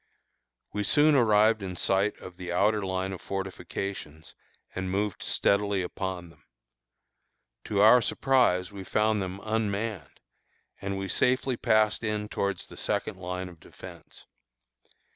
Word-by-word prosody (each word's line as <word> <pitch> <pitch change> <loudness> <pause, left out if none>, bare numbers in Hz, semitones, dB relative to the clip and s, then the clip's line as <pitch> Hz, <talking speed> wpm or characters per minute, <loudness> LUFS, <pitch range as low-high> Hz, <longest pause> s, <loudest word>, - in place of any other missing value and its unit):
We 105 - -1
soon 150 +8 +4
arrived 110 -4 +4
in 95 -2 -5
sight 95 +3 +1
of 90 -1 -11
the 90 -1 -6
outer 105 +3 +2
line 95 0 -2
of 90 - -8
fortifications, 95 -4 -6 0.4
and 95 0 -3
moved 100 +1 -1
steadily 100 -1 +1
upon 90 -1 -5
them. - - -24 1.2
To 100 -2 +1
our 110 +4 +8
surprise, 115 -7 +2
we 100 -1 -8
found 105 +1 +1
them 95 +1 -5
unmanned, 110 -2 -2 0.6
and 100 0 -3
we 95 0 -3
safely 125 +5 +1
passed 110 -1 +2
in 105 -1 -2
towards 100 -2 -2
the - - -14
second - - -2
line 90 0 -4
of 85 -2 -13
defence. - - -13
100 Hz, 135 wpm, -28 LUFS, 95-110 Hz, 1.2 s, our